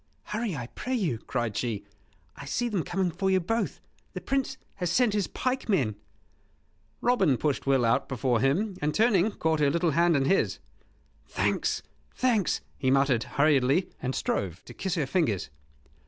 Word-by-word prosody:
"Hurry, 215 -4 -3
I 125 -4 -4
pray 255 - -4
you," 170 - 0
cried 120 -3 -3
she; 110 -5 -2 0.5
"I 140 - -9
see 240 +12 -1
them 200 -6 0
coming 180 +1 -1
for 190 +4 -1
you 190 0 +4
both. 225 +6 -2 0.3
The - - -4
Prince 270 -1 -1 0.2
has 180 -2 -1
sent 230 +4 +3
his 205 -3 0
pikemen 200 - 0 0.5
" - - -40
Robin 195 - +3
pushed 145 -1 -1
Will 135 -3 +3
out 115 - +1
before 125 -2 +1
him; 185 - +1
and, 150 0 0
turning, 215 -3 +4
caught 160 -6 0
her 145 -2 +4
little 170 +2 +1
hand 170 0 +3
in 135 - +1
his. 195 +7 +2 0.7
"Thanks, - - 0 0.3
thanks," 230 - +1 0.2
he 130 - +1
muttered, 135 -3 +3
hurriedly, 140 +3 +3
and 130 0 -2
strove 90 -3 -2
to - - -10
kiss 190 -1 -2
her 155 -5 0
fingers. 130 - 0
165 Hz, 170 wpm, -28 LUFS, 135-200 Hz, 0.7 s, you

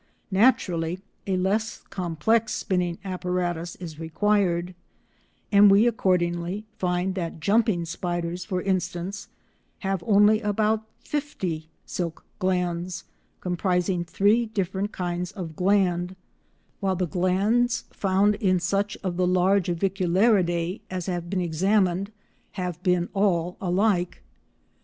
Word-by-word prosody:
Naturally 185 -5 +2 0.3
a 190 -1 +1
less 205 +4 -1
complex 185 +6 +1
spinning 180 -2 -1
apparatus 180 -2 -2
is 160 -4 -8
required, 180 +1 +1 0.8
and 205 0 +8
we 200 +3 +6
accordingly 180 -3 0
find 180 +1 0
that 170 -3 -4
jumping 200 -1 +2
spiders, 175 +1 -3
for 185 -3 -3
instance, 190 0 -2 0.5
have 195 -3 -1
only 210 +1 +5
about 215 +1 0 0.2
fifty 185 - -3 0.2
silk 170 -3 -4
glands 180 -2 -1 0.4
comprising 180 0 0
three 205 +7 +2
different 195 -1 -2
kinds 175 0 -3
of 175 -6 -6
gland, 185 -1 +1 0.6
while 190 -1 0
the 180 0 0
glands 200 - +1
found 195 +1 +2
in 190 -3 +1
such 200 +3 -1
of 180 -2 -2
the 180 -1 +2
large 185 +1 +3
Aviculariidae 185 0 +1
as 185 -2 -4
have 175 -2 -3
been 190 -1 0
examined 190 +3 +1 0.4
have 180 -3 -4
been 180 -2 +2
all 180 -3 +1
alike. 185 -1 +1
185 Hz, 115 wpm, -25 LUFS, 175-200 Hz, 0.8 s, and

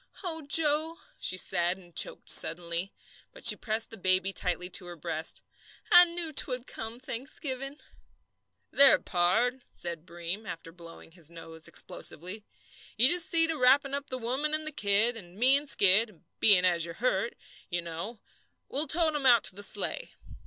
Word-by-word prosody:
"Oh, 325 -3 -3
Joe," 310 +2 +1 0.2
she 185 - 0
said, 175 0 0
and 175 -3 -19
choked - - 0
suddenly; 170 +2 +2 0.4
but - - -13
she - - +9
pressed 220 0 -2
the 225 - -9
baby 185 +1 +1
tightly 180 -1 -2
to 180 - -2
her 175 - -9
breast. 160 0 -3 0.5
"I 355 0 +9
knew 340 -2 -7
'twould 255 -3 +1
come 225 -1 -7
Thanksgiving." 265 +2 -6 0.9
"There, 280 -1 +6
pard," 215 +9 0
said 170 -1 -7
Breem, 175 +5 -7
after 165 0 -8
blowing 165 -1 -14
his 165 -2 -12
nose 165 -1 -8
explosively, 185 +6 -4 0.5
"you 245 +4 +5
just 345 0 +4
see 330 -1 +3
to 325 0 -2
wrappin' 270 +2 +3
up 280 0 -4
the 255 - -3
woman 265 +6 -2
and 310 0 -4
the 310 - -4
kid, 215 -1 +1
and 180 -5 -13
me 255 +6 +4
and 285 0 -2
Skid, 200 -2 +3 0.2
being 190 -4 +6
as 170 -2 +2
you're 170 0 -5
hurt, 230 -1 -1 0.3
you 175 -2 -3
know, 170 +7 -7 0.5
'll 295 +3 +1
tote 315 +2 +1
'em 285 -3 0
out 240 -3 +5
to 190 - -3
the 205 - -7
sleigh." - - -2
220 Hz, 170 wpm, -28 LUFS, 175-280 Hz, 0.9 s, she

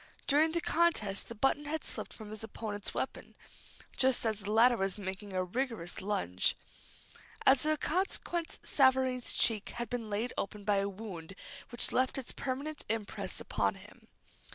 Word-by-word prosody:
During 310 +3 +4
the 340 - +1
contest 310 -15 +2
the 230 - -6
button 270 +6 +2
had 310 +2 -2
slipped - - -4
from 215 -2 -9
his 215 0 -5
opponent's 210 -1 -4
weapon, - - -4 0.6
just 260 -2 +4
as 215 -2 +1
the 205 0 -3
latter 240 +3 +6
was 195 -1 0
making 195 +1 -5
a 185 0 0
vigorous 225 -4 -2
lunge. 95 - +1 0.9
As 270 +2 +6
a 310 0 +4
consequence 345 0 -1
Savareen's 260 -2 +3
cheek 215 -3 +2
had 240 0 -3
been 235 -3 -3
laid 215 +4 -1
open 205 +1 -4
by 205 0 +3
a 200 0 +1
wound 195 -4 -8 0.3
which 240 - 0
left 255 +1 +2
its 265 - -5
permanent 280 +3 -4
impress 220 -2 -3
upon - - 0
him. - - -15
225 Hz, 160 wpm, -32 LUFS, 205-270 Hz, 0.9 s, latter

